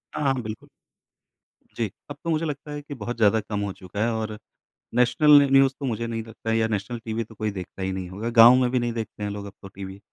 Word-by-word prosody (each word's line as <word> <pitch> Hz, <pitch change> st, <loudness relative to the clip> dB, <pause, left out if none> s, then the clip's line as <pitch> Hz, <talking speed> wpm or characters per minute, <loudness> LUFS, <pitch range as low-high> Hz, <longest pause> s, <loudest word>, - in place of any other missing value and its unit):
हाँ -, -, -2 dB
हाँ, 135 Hz, -, +3 dB
बिल्कुल। 110 Hz, 0 st, -7 dB, 1.1 s
जी, 110 Hz, -4 st, -2 dB, 0.2 s
अब 145 Hz, -, -6 dB
तो 170 Hz, -, -3 dB
मुझे 160 Hz, 0 st, +1 dB
लगता 150 Hz, -1 st, -5 dB
है 145 Hz, -, -5 dB
कि 145 Hz, 0 st, -8 dB
बहुत 120 Hz, -1 st, -5 dB
ज़्यादा 110 Hz, -1 st, +4 dB
कम 105 Hz, 0 st, -4 dB
हो 100 Hz, -1 st, -2 dB
चुका 95 Hz, +3 st, -4 dB
है 115 Hz, -, +1 dB
और 110 Hz, -1 st, -3 dB, 0.6 s
नेशनल 125 Hz, +5 st, +4 dB
न 140 Hz, -, +2 dB
न्यूज़ 135 Hz, 0 st, +6 dB
तो 140 Hz, -, -5 dB
मुझे 115 Hz, -1 st, -2 dB
नहीं 115 Hz, -1 st, -3 dB
लगता 115 Hz, 0 st, -6 dB
है 115 Hz, -, +2 dB
या 110 Hz, 0 st, +2 dB
नेशनल 110 Hz, +3 st, -3 dB
टीवी 115 Hz, 0 st, -2 dB
तो 110 Hz, -, -16 dB
कोई 110 Hz, 0 st, -2 dB
देखता 95 Hz, -1 st, -7 dB
ही 95 Hz, 0 st, -1 dB
नहीं 95 Hz, -1 st, -4 dB
होगा। 110 Hz, +5 st, -4 dB
गाँव 115 Hz, +1 st, +9 dB
में 125 Hz, -1 st, +2 dB
भी 125 Hz, -, +2 dB
नहीं 120 Hz, -1 st, -1 dB
देखते 110 Hz, -2 st, -6 dB
हैं 105 Hz, -, -2 dB
लोग 100 Hz, 0 st, -5 dB
अब 100 Hz, -, -9 dB
तो 95 Hz, -, -8 dB
टीवी। 95 Hz, 0 st, -9 dB
115 Hz, 260 wpm, -25 LUFS, 105-125 Hz, 1.1 s, गाँव